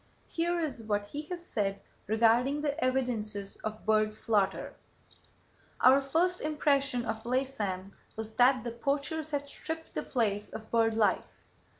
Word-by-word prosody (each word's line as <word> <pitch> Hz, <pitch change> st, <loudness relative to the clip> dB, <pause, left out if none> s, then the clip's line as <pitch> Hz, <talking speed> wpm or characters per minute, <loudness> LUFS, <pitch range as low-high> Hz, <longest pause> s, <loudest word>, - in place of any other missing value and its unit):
Here 345 Hz, +1 st, 0 dB
is 295 Hz, -8 st, -2 dB
what 205 Hz, -2 st, -1 dB
he 295 Hz, +4 st, -6 dB
has 350 Hz, -1 st, -5 dB
said 200 Hz, -, -1 dB, 0.3 s
regarding 235 Hz, +7 st, +3 dB
the 290 Hz, +1 st, -1 dB
evidences 220 Hz, -6 st, -1 dB
of 215 Hz, 0 st, -6 dB
bird 215 Hz, 0 st, +3 dB
slaughter: 210 Hz, -3 st, 0 dB, 1.1 s
"Our 265 Hz, +2 st, +7 dB
first 340 Hz, +7 st, +1 dB
impression 280 Hz, -5 st, +1 dB
of 220 Hz, -1 st, -3 dB
Laysan 225 Hz, -7 st, -2 dB, 0.2 s
was 220 Hz, 0 st, -5 dB
that 255 Hz, -1 st, +5 dB
the 240 Hz, -, -3 dB
poachers 285 Hz, +6 st, -2 dB
had 285 Hz, -2 st, -2 dB
stripped 320 Hz, +3 st, -6 dB
the -, -, -1 dB
place 210 Hz, -4 st, -1 dB
of 220 Hz, 0 st, -9 dB
bird 225 Hz, -1 st, +3 dB
life. 220 Hz, -2 st, 0 dB
245 Hz, 140 wpm, -30 LUFS, 215-285 Hz, 1.1 s, Our